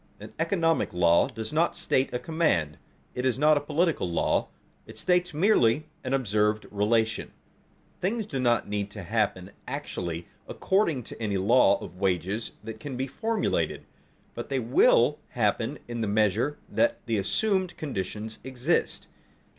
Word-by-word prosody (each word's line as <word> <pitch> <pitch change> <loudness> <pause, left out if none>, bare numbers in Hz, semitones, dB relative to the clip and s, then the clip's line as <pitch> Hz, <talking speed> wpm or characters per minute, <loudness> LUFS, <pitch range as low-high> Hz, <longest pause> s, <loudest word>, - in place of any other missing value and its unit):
An - - -11
economic 165 - +1
law 85 +2 +4
does 110 -2 -6
not 165 +3 +2
state 130 - +1
a 125 - -1
command; 120 - 0 0.3
it 125 - -3
is 130 -2 +1
not 150 +2 +5
a - - +2
political 155 - 0
law; 85 - +1 0.4
it - - -11
states 180 0 +2
merely 155 - +3 0.2
an 130 - -3
observed 105 -4 +1
relation. 110 +2 +1 0.7
Things 215 +4 -1
do 135 -10 -4
not 120 -3 +2
need 100 -1 -2
to 100 -2 -8
happen 100 -1 -1 0.2
actually 90 - -4 0.2
according 170 - +1
to - - -10
any 105 -3 0
law 115 +7 +4
of 90 - -9
wages 95 +3 -1
that 110 -1 -7
can 130 +1 -6
be 130 - -1
formulated, 220 - -1 0.5
but - - -6
they - - 0
will - - +4
happen - - 0
in 120 -1 -4
the 110 - 0
measure 110 +7 +1
that 290 0 +1
the 115 -3 0
assumed 185 - 0
conditions 110 -5 -5
exist. 130 +5 -1
120 Hz, 150 wpm, -27 LUFS, 105-160 Hz, 0.7 s, not